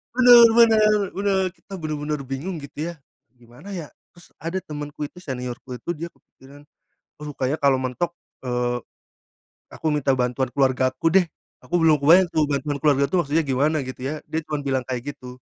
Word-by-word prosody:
Benar 245 -2 +9
benar 215 -2 +6 0.2
benar, 195 -1 0
kita 195 - -16
benar-benar 150 -3 -3
bingung 135 +8 -5
gitu 150 +3 -5
ya, 170 - -5 0.4
"Gimana 120 +8 -17
ya?" 165 -5 -7 0.2
Terus 175 - -18
ada 165 +3 -3
temanku 145 0 -6
itu, 165 +5 -8
seniorku 125 -4 -6
itu, 125 +8 -10
dia 170 0 -5
kepikiran 140 -3 -18 0.5
"Aduh, 150 0 -7
kayaknya 135 +1 -1
kalau 135 -2 +4
mentok," 130 +7 -2 0.3
eee, 125 -1 -1 0.9
"aku - - -7
minta 145 -2 +1
bantuan 125 0 -1
keluarga 130 -1 +2
aku 130 +5 0
deh." 190 - +6 0.4
Aku 175 +1 0
belum 160 -2 +5
kebayang 170 +6 +5
tuh 155 -2 +1
bantuan 145 0 -2
keluarga 140 -1 +2
tuh 180 -3 +1
maksudnya 150 +4 +1
gimana 145 +2 +1
gitu 130 -1 -7
ya. 150 +3 -3
Dia 160 0 -3
cuman 150 -1 -3
bilang 135 -2 -1
kayak 130 +3 -5
gitu. 125 -2 -11
145 Hz, 175 wpm, -23 LUFS, 130-165 Hz, 0.9 s, Benar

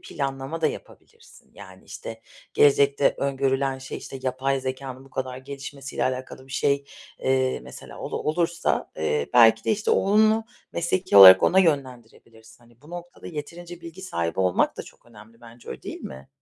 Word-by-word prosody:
planlama 135 +2 -5
da 160 - +3
yapabilirsin. - - -10
Yani, 95 -2 -14
işte, 115 0 -9 0.3
gelecekte 140 0 +4
öngörülen 135 -1 0
şey, 130 0 -7
işte, 135 - -9
yapay 135 +1 -1
zekânın 130 0 -6
bu 135 - -19
kadar 130 -1 -4
gelişmesiyle 140 +1 -6
alakalı 130 0 -4
bir 135 - -12
şey, 140 +1 +1 0.3
eee, 130 -1 0
mesela - - -12
olur - - -4
olursa, 165 +1 -1
eee, 75 -2 -1
belki 115 -2 +6
de, - - 0
işte, 215 0 0
oğlunu 215 +3 +3 0.3
mesleki 175 - 0
olarak 95 -1 +11
ona 190 - +4
yönlendirebilirsin. 120 -8 -2
Hani, 120 0 -24
bu 150 - -16
noktada 175 0 -10
yeterince 170 +2 -8
bilgi 170 +2 -10
sahibi 85 - -3
olmak 90 -1 +1
da - - -5
çok - - -18
önemli 115 0 -17
bence, 120 0 -15
öyle - - -8
değil - - -7
mi? 65 0 -10
135 Hz, 160 wpm, -24 LUFS, 120-155 Hz, 0.3 s, olarak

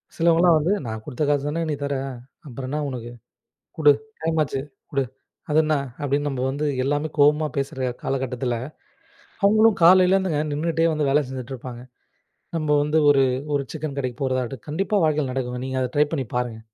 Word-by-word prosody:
சில 165 - -1
ஆட்கள் 165 - +3
எல்லாம் 175 -2 +6
வந்து, 170 +7 +1
"நான் 110 -1 -5
குடுத்த 140 +5 -3
காசுதானே 145 +3 0
நீ 150 - 0
தர 140 0 -1 0.5
அப்புறம் 130 0 -6
என்ன 150 +2 -2
உனக்கு? 120 -2 -6 0.7
குடு 150 -2 +7 0.3
டைம் 160 0 0
ஆச்சு 135 -2 -2 0.3
குடு." 140 -1 +1 0.5
அதென்ன 155 0 +3 0.3
அப்டின்னு 145 +1 0
நம்ப 135 -3 -3
வந்து 145 +3 -2 0.2
எல்லாமே 145 +3 0
கோவமா 150 +2 +4
பேசுற 135 -2 -2
காலகட்டத்துல, 130 -2 -2 0.9
அவங்களும் 215 +1 +5
காலையில் 185 +2 +7
இருந்து 190 -3 0 0.2
நின்னுட்டே 165 +2 +1
வந்து 150 -2 0
வேலை 145 +2 +3
செஞ்சிட்டு 130 0 -6
இருப்பாங்க. 120 -1 -8 0.8
நம்ப 155 -2 -1
வந்து 150 +2 +1
ஒரு 135 -1 +5 0.3
ஒரு 140 - +1
சிக்கன் 155 -3 -5
கடைக்குப் 130 -1 -4
போவதற்கு. 130 -1 -1
கண்டிப்பா 195 +7 0
வாழ்க்கையில 150 -3 +1
நடக்கும். 125 -1 -3
நீங்க 130 0 -2
அதை 125 - -1
ட்ரை 150 0 +5
பண்ணி 135 -5 -1
பாருங்க. 120 -3 -2
145 Hz, 170 wpm, -23 LUFS, 130-155 Hz, 0.9 s, குடு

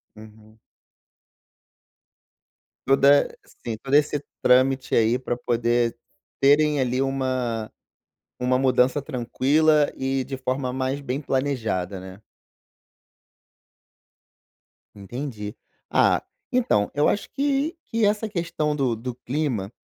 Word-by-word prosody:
Uhum. 110 0 -16 2.3
Toda 140 +1 +5 0.4
sim, 115 -2 -2
todo 135 +1 0
esse 145 -1 +2 0.2
trâmite, 130 +1 +3
aí, 115 +2 +3
pra 125 -1 -3
poder 120 -1 0 0.4
terem, 145 +1 +4
ali, 130 0 0
uma 130 -5 -2 0.7
uma 125 0 +2
mudança 130 +1 +3
tranquila 145 +4 +2
e 135 0 -1
de 135 - -5
forma 130 0 -2
mais 130 +2 -2
bem 135 0 -3
planejada, 115 -10 -2
né. 95 +1 -11 2.8
Entendi. 105 0 -6 0.3
Ah, - - +3 0.3
então 240 - +2
eu 145 - +3
acho 205 - -2
que 280 +3 0
que 230 -1 0
essa 210 +1 0
questão 165 -5 -2
do 130 -5 0
do 125 +3 -5
clima, 125 -5 -3
130 Hz, 105 wpm, -24 LUFS, 120-145 Hz, 2.8 s, Toda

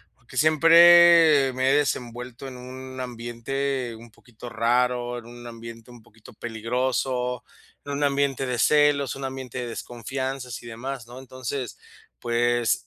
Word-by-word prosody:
porque 130 0 -14
siempre 165 -1 +6
me 130 +1 +1
he 135 - +4
desenvuelto 125 -2 -3
en 130 - -9
un 130 +1 -9
ambiente 125 +2 -4
un 115 +1 -13
poquito 120 +1 -13
raro, 120 +1 0
en 115 - -15
un 120 0 -12
ambiente 115 0 -10
un 120 -1 -14
poquito 110 0 -18
peligroso, 125 +2 -2 0.4
en 145 - -6
un 140 +1 -2
ambiente 140 -2 0
de 125 - -2
celos, 145 +1 +3
un 135 - -8
ambiente 130 -2 -6
de 125 - -4
desconfianzas 125 +2 -5
y - - -13
demás, 120 +2 -6
¿no? 120 +2 -11
Entonces, 130 -1 -6 0.4
pues, 120 0 0
125 Hz, 145 wpm, -24 LUFS, 120-135 Hz, 0.4 s, siempre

